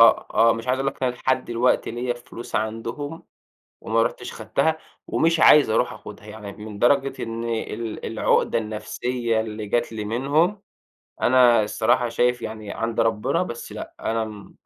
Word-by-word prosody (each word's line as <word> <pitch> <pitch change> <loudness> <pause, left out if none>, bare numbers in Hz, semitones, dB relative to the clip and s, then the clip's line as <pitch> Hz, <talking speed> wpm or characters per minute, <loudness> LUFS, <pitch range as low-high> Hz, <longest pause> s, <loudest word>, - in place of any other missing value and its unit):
آه، 115 - +6
آه 115 0 +6
مش 115 +1 -6
عايز 130 +1 +2
أقول 135 - -1
لك 135 - -16
إن 130 - +3
أنا 125 - -4
لحد 130 +1 0
دلوقتي 120 +2 +1
ليَّ 120 +1 -2
فلوس 120 0 -10
عندهم، 115 +8 -3 0.6
وما 115 +1 +1
رُحتش - - -3
خدتها 160 0 0 0.3
ومش 165 0 +2
عايز 150 -6 +7
أروح 110 - +2
آخُدها، - - -11
يعني 105 -1 -8
من 105 0 -9
درجة 135 +2 +2
إن 115 0 -4
ال 115 -1 -4
العقدة - - +1
النفسية 115 +2 -2
اللي 110 -1 -5
جات 120 +2 0
لي 110 -1 -4
منهم، 145 - +1 0.6
أنا 120 -3 +5
الصراحة 110 +3 +1
شايف 125 +1 +1
يعني 110 -1 -6
عند 115 -1 -2
ربنا، 110 -2 +1
بس - - -6
لأ، - - -8
أنا 110 -2 -3
115 Hz, 165 wpm, -23 LUFS, 110-125 Hz, 0.6 s, عايز